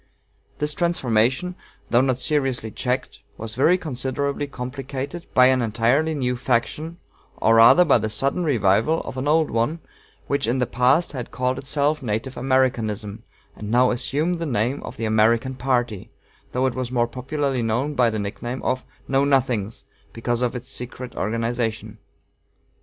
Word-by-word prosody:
This 150 0 -1
transformation, 135 -1 +1 0.4
though 120 - +5
not 130 -2 +1
seriously 130 -5 -1
checked, 125 +4 -3 0.2
was 110 0 -6
very 150 +9 +4
considerably 140 -1 -2
complicated 135 +4 -6
by 125 - +7
an 130 0 +4
entirely 120 +8 +1
new 125 -3 -1
faction, 130 +7 -1 0.4
or 115 - +3
rather 115 +10 +7
by 155 - +4
the 110 - -2
sudden 135 +10 0
revival 115 - +2
of - - -7
an 130 +2 -2
old 155 +1 +3
one, 115 +9 0 0.5
which 140 -4 -1
in 120 +3 +1
the 125 - +1
past 130 +8 +2
had 125 -4 -6
called 125 +1 -1
itself 145 +2 0
Native 115 +2 -3
Americanism, 115 -5 0 0.3
and 105 - -7
now 125 +2 +4
assumed 150 +8 -1
the 165 - -2
name 125 +2 0
of - - -8
the 115 - -2
American 115 +4 +2
Party, 120 -5 -1 0.4
though 130 +1 0
it 130 - +1
was 130 -1 -4
more 120 -2 +1
popularly 130 +2 -2
known 120 +6 -1
by 125 -4 +3
the 110 - -3
nickname 120 +5 -5
of 130 0 -1 0.2
"Know 135 +1 +2
Nothings," 125 -7 0 0.3
because 120 +1 -2
of 125 0 0
its 125 0 -6
secret 125 -1 -6
organization. 115 0 -2
125 Hz, 160 wpm, -23 LUFS, 115-140 Hz, 0.5 s, by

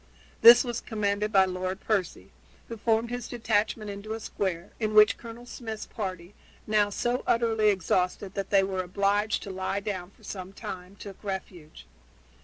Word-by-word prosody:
This 235 +2 +10
was 240 -2 -3
commanded 210 -1 -1
by 190 -2 +6
Lord 185 +1 -3
Percy, 205 -5 -2 0.4
who 230 - -6
formed 225 +2 +1
his 245 -1 -4
detachment 215 -2 -1
into 215 +3 -6
square, 185 -5 -3
in 215 -2 -1
which 215 0 +7
Colonel 235 +1 -10
Smith's 225 -3 -6
party, 185 -3 -6 0.3
now 210 -1 +2
so 240 +5 -1
utterly 225 -2 +3
exhausted 185 0 0
that 195 -1 -4
they 195 -1 +4
were 190 -1 -1
obliged 200 +3 0
to 200 - -6
lie 190 +1 -2
down 195 -3 -4
for - - -25
some 190 -1 -7
time, 185 0 -8
took 200 0 -11
refuge. 190 -5 -7
205 Hz, 160 wpm, -28 LUFS, 190-220 Hz, 0.4 s, This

